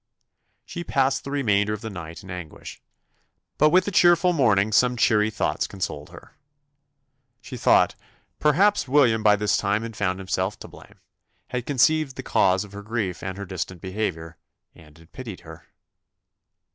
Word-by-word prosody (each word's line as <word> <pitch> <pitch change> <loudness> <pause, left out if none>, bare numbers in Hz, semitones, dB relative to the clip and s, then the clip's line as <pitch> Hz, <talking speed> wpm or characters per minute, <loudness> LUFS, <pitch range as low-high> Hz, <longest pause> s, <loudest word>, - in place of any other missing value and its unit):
She 175 - -6
passed 135 -3 0
the - - -7
remainder 105 -7 +1
of 105 - -6
the 110 - -6
night 85 -3 -9
in 95 - -10
anguish: 90 -4 -9 0.8
but 150 - +5
with 185 +3 +3
the 205 - -3
cheerful 175 0 +4
morning 110 - +2
some 125 +3 +3
cheery 110 -2 +3
thoughts 110 - -2
consoled 75 -6 -5
her. - - -15 1.1
She 130 - -10
thought 120 - +3 0.5
"perhaps 185 +5 +3
William 125 -5 +3
by 105 -1 +5
this 105 0 +1
time 105 +2 0
had 115 -1 -7
found 95 -3 -1
himself 95 +1 -2
to - - -8
blame; - - -16 0.5
had 125 -1 -4
conceived 145 +1 +2
the 130 - -7
cause 95 -3 +2
of 105 - -13
her 100 0 -8
grief 105 -4 -3
and 95 0 -5
her 100 - -6
distant 90 -1 -5
behaviour, 85 -4 -4 0.4
and 75 -1 -18
had 80 +1 -20
pitied 115 -8 -9
her." - - -13
105 Hz, 165 wpm, -24 LUFS, 95-135 Hz, 1.1 s, but